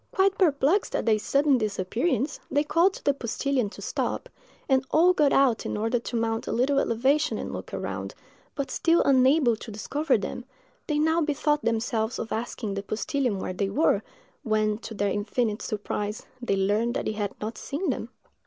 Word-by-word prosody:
Quite 390 0 +3
perplexed 335 +1 +2
at - - -1
their 220 -2 +3
sudden 280 +3 +2
disappearance, 225 - -1
they 290 +1 +2
called 335 +5 +3
to - - -11
the 285 - +3
postillion 255 -2 -1
to - - -11
stop, - - -2 0.4
and 265 -2 +3
all 350 +3 +5
got 300 -5 +3
out 260 -5 +3
in - - -3
order 225 +3 0
to 235 - -6
mount 225 -1 -1
a - - -2
little 270 +4 +2
elevation 265 +5 +1
and - - -5
look - - -7
around; - - -4 0.4
but 280 -1 -3
still 335 0 +3
unable 260 -1 +4
to 225 - -9
discover 265 +7 0
them, 210 +5 -5 0.4
they 300 - 0
now 320 +2 +2
bethought 295 -1 +1
themselves 225 0 0
of 225 - -5
asking 225 -2 -3
the 200 - -3
postillion 220 +2 -1
where 185 - -4
they 195 +2 -1
were, 290 +11 +2 0.4
when, 215 -4 0
to 225 -1 -8
their 205 -1 0
infinite 215 +2 -1
surprise, 210 -1 -3 0.2
they 240 -5 0
learned 205 +5 +1
that - - -2
he - - -1
had 205 -2 -4
not 215 +2 -4
seen 300 +2 -2
them. 235 - -4
245 Hz, 185 wpm, -26 LUFS, 215-290 Hz, 0.4 s, all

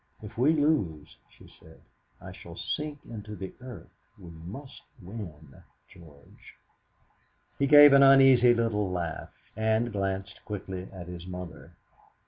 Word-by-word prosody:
"If 105 +2 -10
we 135 +7 +3
lose," 100 - -1
she - - -18
said, 80 0 -18 0.4
"I - - -10
shall - - -12
sink 150 -1 -5
into 105 -2 -8
the 95 -1 -8
earth. 125 -1 -11 0.3
We 90 -4 -12
must 95 - -11 0.2
win, 85 -8 -10 0.3
George." 75 -6 -18 1.0
He 140 - +2
gave 145 0 +9
an 140 - +7
uneasy 135 -3 +6
little 110 -4 0
laugh, 85 -3 -4 0.3
and 110 +2 0
glanced 95 -1 -4
quickly 95 -2 -7
at 95 -2 -9
his 90 0 -9
mother. 90 -1 -9
105 Hz, 130 wpm, -28 LUFS, 90-125 Hz, 1.0 s, gave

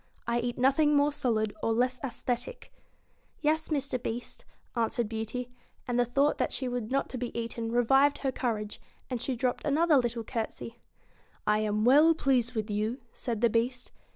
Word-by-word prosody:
I 235 0 +1
eat 240 0 -2
nothing 285 +4 +4
more 290 +1 +4
solid 220 -6 0
or 225 - +1
less 250 +2 +1
aesthetic.' 250 - -4 0.3
' - - -42 0.3
Yes, 315 +1 +1
Mr. 275 -5 -1
Beast,' 240 +1 -5 0.3
answered 235 0 0
Beauty; 225 +3 -4 0.4
and 245 0 0
the 245 - +4
thought 275 +5 +1
that - - 0
she 260 - -2
was 245 -3 -3
not 275 +1 0
to 255 - -5
be 245 0 -3
eaten 230 0 -3
revived 270 +4 +4
her 265 - +2
courage, 215 -5 -3 0.3
and 245 -2 -2
she 260 - -1
dropped 245 +1 -1
another 305 +1 +4
little 240 -2 0
courtesy. 230 0 -5 0.7
4 210 - +4
1 210 - +2
am 210 +1 0
well 300 +6 +6
pleased 255 -5 +1
with 215 -1 -2
you,' 215 +4 -1 0.2
said 230 -3 -4
the 235 - +5
Beast. 245 +2 -1
245 Hz, 180 wpm, -29 LUFS, 230-270 Hz, 0.7 s, well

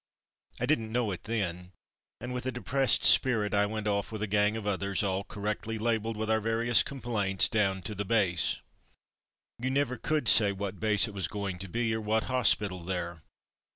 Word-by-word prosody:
I - - 0
didn't 110 -1 0
know 120 -3 0
it 90 - -7
then, 90 -5 -3 0.5
and 120 +2 -6
with 125 +1 -4
a - - 0
depressed 130 +2 +2
spirit 110 -6 +4
I 100 0 +3
went 110 0 -4
off 100 0 -1
with 110 -1 -4
a - - +1
gang 105 +1 +1
of 110 - -6
others, 100 0 -1
all 95 0 -1
correctly 105 +2 -4
labelled 110 0 -1
with 110 0 -2
our 110 0 +2
various 115 +2 +3
complaints, 110 -8 0
down 95 -3 0
to 110 - -4
the 105 0 -3
base. 95 -5 +1 1.0
You 130 +2 -2
never 130 -2 0
could 155 -6 -1
say 100 -1 +5
what 100 0 -5
base 110 0 +4
it 105 - -9
was 95 -2 -2
going 100 -3 -5
to 95 - -7
be, 115 +2 -1
or 110 - -2
what 110 +1 0
hospital 105 -7 +1
there. 85 -1 -4
105 Hz, 190 wpm, -29 LUFS, 100-115 Hz, 1.0 s, say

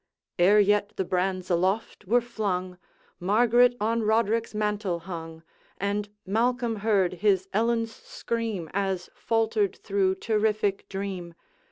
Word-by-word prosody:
Ere 200 +4 +6
yet 205 0 +2
the 190 - -1
brands 185 0 -1
aloft 190 +5 0
were 240 +4 +4
flung, 185 -6 -3 0.4
Margaret 240 +6 +4
on 230 +2 +1
Roderick's 225 +1 +1
mantle 210 -4 -1
hung, 165 -2 -8 0.3
And 205 +1 -2 0.2
Malcolm 235 +3 0
heard 200 -4 +2
his 195 -3 +3
Ellen's 230 +1 +1
scream, 225 -7 -4
As 195 -2 -2
faltered 220 -3 0
through 195 -2 0
terrific 210 -1 0
dream. 190 -3 -5
205 Hz, 120 wpm, -26 LUFS, 190-225 Hz, 0.4 s, Ere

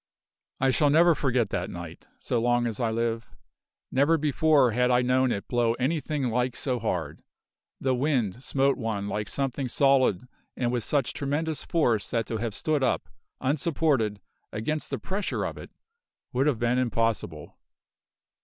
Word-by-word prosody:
I 135 0 +3
shall 145 +3 +3
never 170 +4 +6
forget 130 -7 0
that - - -2
night, 85 -1 -9
so 120 - -1
long 120 0 +2
as 115 -3 -3
I 115 -2 +1
live. 115 0 -2 0.6
Never 145 +5 +3
before 150 -3 +3
had 125 +3 +2
I 125 0 +3
known 130 0 +2
it 100 - -3
blow 120 -2 +2
anything 140 -1 -1
like 125 +1 0
so 125 -3 -1
hard; 85 -10 -3 0.6
the 130 -1 +1
wind 125 -5 0
smote 135 0 +1
one 110 -4 -3
like 105 0 -3
something 135 -1 -2
solid 130 -4 +2 0.3
and 120 -1 0
with 120 -2 -1
such 140 -1 0
tremendous 150 +2 -2
force 120 -11 +1
that 115 -2 0
to 115 - -3
have 110 -2 -3
stood 150 +1 0
up, - - 0 0.3
unsupported, 140 - +1 0.3
against 150 +9 -3
the - - -2
pressure 195 +2 -2
of - - -4
it, - - -10 0.6
would 130 +3 +2
have 145 -6 +2
been 120 +2 +1
impossible. 115 -10 -1
125 Hz, 160 wpm, -27 LUFS, 115-140 Hz, 0.6 s, never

